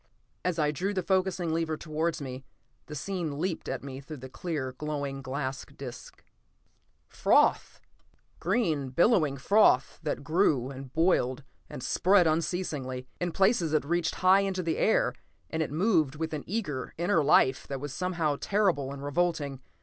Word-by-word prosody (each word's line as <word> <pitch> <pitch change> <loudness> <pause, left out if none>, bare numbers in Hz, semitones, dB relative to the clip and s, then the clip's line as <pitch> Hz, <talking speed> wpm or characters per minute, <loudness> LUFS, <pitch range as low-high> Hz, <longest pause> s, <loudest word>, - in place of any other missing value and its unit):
As 180 -2 0
I 150 -2 +2
drew 190 +7 -2
the 185 - 0
focusing 185 -3 0
lever 160 -1 -1
towards 160 0 -2
me, 130 0 -6 0.4
the 150 - -7
scene 160 -1 -3
leaped 170 +1 -2
at - - -3
me 135 -1 -7
through 150 +2 -8
the 130 0 -9
clear, 145 -5 -3
glowing 140 0 -4
glass 135 +1 -3
disc. 125 -3 -10 0.8
Froth! - - +2 0.6
Green, 165 - 0
billowing 155 - +3
froth 140 -3 +3
that - - -3
grew 145 -5 +2
and 135 -1 -9
boiled 145 -5 +1 0.3
and 125 - -7
spread 185 +7 +4
unceasingly. 155 -6 -1
In 175 -1 -1
places 190 -4 +2
it 155 - +2
reached 170 +2 0
high 185 +1 +5
into 190 -2 -1
the 165 -1 -1
air, - - +3 0.4
and 160 - -1
it 155 - -1
moved 160 -4 +2
with 160 +1 -3
an 150 - -4
eager, 165 - -3
inner 170 -1 +2
life 135 -2 +4
that 135 -1 -4
was 145 0 -6
somehow 165 -4 -1
terrible 185 -10 +1
and 140 0 -7
revolting. 145 -3 -1
155 Hz, 155 wpm, -29 LUFS, 140-180 Hz, 0.8 s, high